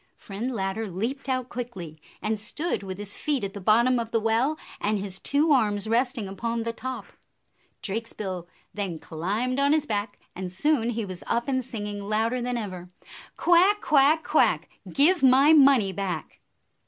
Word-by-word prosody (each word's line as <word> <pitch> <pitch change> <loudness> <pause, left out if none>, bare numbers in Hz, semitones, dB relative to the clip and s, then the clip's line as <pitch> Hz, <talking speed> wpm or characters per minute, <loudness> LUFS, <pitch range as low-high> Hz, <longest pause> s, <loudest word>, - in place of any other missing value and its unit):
Friend 215 +6 -5
Ladder 205 -1 -2
leaped 235 +10 -4
out 255 -1 -1
quickly, 185 -11 -7 0.2
and 215 0 -1
stood 300 +10 -2
with 190 -2 -6
his 205 0 -5
feet 290 -6 -1
at 195 0 -3
the 200 - -7
bottom 235 +5 +4
of 230 -1 -4
the 230 - +1
well 230 +7 +1 0.2
and 210 +1 0
his 195 -1 -4
two 300 +3 +1
arms 210 -7 +2
resting 240 -1 0
upon 230 +4 -3
the 230 0 -3
top. 260 +3 -7 0.7
Drakesbill 195 -4 -4 0.3
then 195 -5 -3
climbed 205 - -2
on 280 +1 +3
his 310 -1 +2
back, 205 -3 -3 0.2
and 180 0 -5
soon 240 +4 +1
he 230 -2 -2
was 185 -2 -8
up 235 +1 0
and 260 -2 0
singing 210 -4 -5
louder 220 +4 0
than 245 0 -2
ever, 185 -5 -6 0.5
"Quack, 365 +4 +4
quack, 300 +1 +4
quack! - - +2 0.2
Give 320 +5 +4
my 270 +4 +6
money 270 -9 +6
back." 185 -4 -4
225 Hz, 165 wpm, -26 LUFS, 200-260 Hz, 0.7 s, my